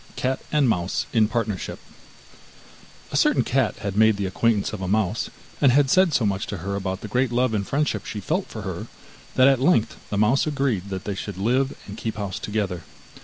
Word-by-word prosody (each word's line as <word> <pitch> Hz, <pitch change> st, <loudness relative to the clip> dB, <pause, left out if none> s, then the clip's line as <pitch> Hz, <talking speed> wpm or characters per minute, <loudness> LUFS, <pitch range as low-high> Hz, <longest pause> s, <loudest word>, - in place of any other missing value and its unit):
CAT 130 Hz, +1 st, -1 dB
AND 150 Hz, -3 st, +3 dB
MOUSE 90 Hz, -5 st, 0 dB
IN 110 Hz, -2 st, +4 dB
PARTNERSHIP 110 Hz, -4 st, -2 dB, 1.3 s
A -, -, -4 dB
certain -, -, +4 dB
cat -, -, +1 dB
had 100 Hz, -2 st, -3 dB
made 110 Hz, 0 st, +5 dB
the 100 Hz, -, -1 dB
acquaintance 105 Hz, +3 st, +1 dB
of 105 Hz, -, -5 dB
a 95 Hz, -, -2 dB
mouse, 105 Hz, +2 st, 0 dB, 0.3 s
and 140 Hz, -3 st, +6 dB
had 135 Hz, 0 st, +3 dB
said 185 Hz, -2 st, +5 dB
so 125 Hz, -6 st, +2 dB
much 100 Hz, -1 st, -1 dB
to 105 Hz, -, -4 dB
her 100 Hz, 0 st, -2 dB
about 95 Hz, -1 st, -3 dB
the -, -, -6 dB
great 125 Hz, +3 st, +1 dB
love 125 Hz, -1 st, +1 dB
and 100 Hz, -2 st, -1 dB
friendship 150 Hz, +1 st, 0 dB
she 105 Hz, -, -5 dB
felt 100 Hz, -, -1 dB
for -, -, -7 dB
her, -, -, -5 dB, 0.5 s
that 130 Hz, 0 st, +6 dB
at 135 Hz, -2 st, +4 dB
length 135 Hz, -7 st, +2 dB
the 105 Hz, -, -2 dB
mouse 115 Hz, +8 st, +3 dB
agreed 135 Hz, -10 st, -1 dB
that 95 Hz, -1 st, -4 dB
they 100 Hz, -, -3 dB
should 100 Hz, 0 st, -6 dB
live 125 Hz, +7 st, +1 dB
and 100 Hz, +1 st, -8 dB
keep 110 Hz, -1 st, -3 dB
house 100 Hz, -3 st, -4 dB
together. 100 Hz, -5 st, -2 dB
110 Hz, 210 wpm, -24 LUFS, 100-130 Hz, 1.3 s, and